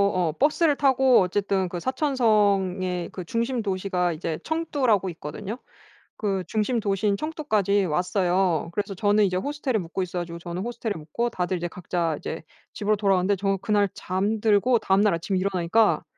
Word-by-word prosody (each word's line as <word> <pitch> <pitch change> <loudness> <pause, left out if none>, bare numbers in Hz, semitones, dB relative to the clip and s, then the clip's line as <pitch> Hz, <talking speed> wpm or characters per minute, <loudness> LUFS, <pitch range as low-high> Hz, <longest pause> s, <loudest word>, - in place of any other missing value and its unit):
어 175 -3 +1
버스를 295 +2 +3
타고 265 -2 +4
어쨌든 190 0 0
그 175 0 -5
사천성의 200 - +1
그 185 - -7
중심 235 +5 -1
도시가 185 -3 -1
이제 160 0 -4
청두라고 275 - 0
있거든요. 190 +8 -6 0.6
그 195 -3 -1
중심 220 +5 0
도시인 200 -1 0
청두까지 215 - 0
왔어요. 180 0 +1
그래서 200 0 -3
저는 205 +2 +3
이제 185 -2 0
호스텔에 285 +2 -1
묵고 180 0 -3
있어 180 0 -4
가지고 170 -1 -6
저는 175 +2 -5
호스텔에 235 -2 -3
묵고 165 +10 -3
다들 185 -4 -2
이제 175 0 -3
각자 170 -2 -2
이제 160 - -6 0.3
집으로 215 0 +1
돌아갔는데 195 -1 +2
저 195 0 0
그날 205 -1 +2
잠들고 210 +4 +1
다음날 200 +1 +3
아침에 170 +3 -1
일어나니까 190 +3 +2
195 Hz, 380 characters per minute, -25 LUFS, 180-225 Hz, 0.6 s, 타고